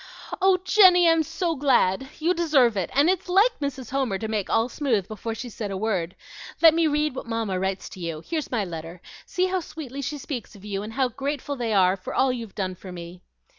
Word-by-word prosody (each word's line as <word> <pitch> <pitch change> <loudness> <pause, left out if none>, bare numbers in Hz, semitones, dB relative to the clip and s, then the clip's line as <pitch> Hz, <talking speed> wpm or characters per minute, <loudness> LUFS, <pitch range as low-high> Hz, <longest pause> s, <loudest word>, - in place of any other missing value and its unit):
"Oh, 380 0 +5
Jenny, 370 -3 +6
I'm 330 -1 +5
so 335 +2 -2
glad! 265 -4 +2
You 335 +3 +1
deserve 295 -10 +3
it, 190 -3 -1
and 285 +3 +5
it's 365 0 0
like 405 +7 +4
Mrs. 270 -4 -4
Homer 260 -7 0
to 220 - -4
make 215 -3 -2
all 225 +1 +2
smooth 240 -7 -1
before 220 +1 -5
she 245 +3 -6
said 215 -2 -5
a 195 - -3
word. 190 -5 -2 0.4
Let 325 -1 +8
me 330 0 +3
read 300 0 0
what 260 - -7
Mamma 225 -5 -2
writes 190 0 -2
to 190 - -11
you. 165 -2 -5
Here's 320 -3 -3
my 225 -5 -1
letter; 165 0 -7 0.3
see 365 - 0
how 375 0 0
sweetly 300 -5 -7
she 295 +2 -3
speaks 260 -6 -6
of 200 0 -14
you, 200 -1 -3
and 215 +2 -7
how 260 0 +1
grateful 280 +3 -4
they 240 -4 -2
are 190 -2 +4
for 185 - -7
all 265 -1 +3
you've 230 -5 -7
done 185 -2 -2
for 185 +1 -11
me." 175 0 -9
245 Hz, 225 wpm, -25 LUFS, 195-305 Hz, 0.4 s, Let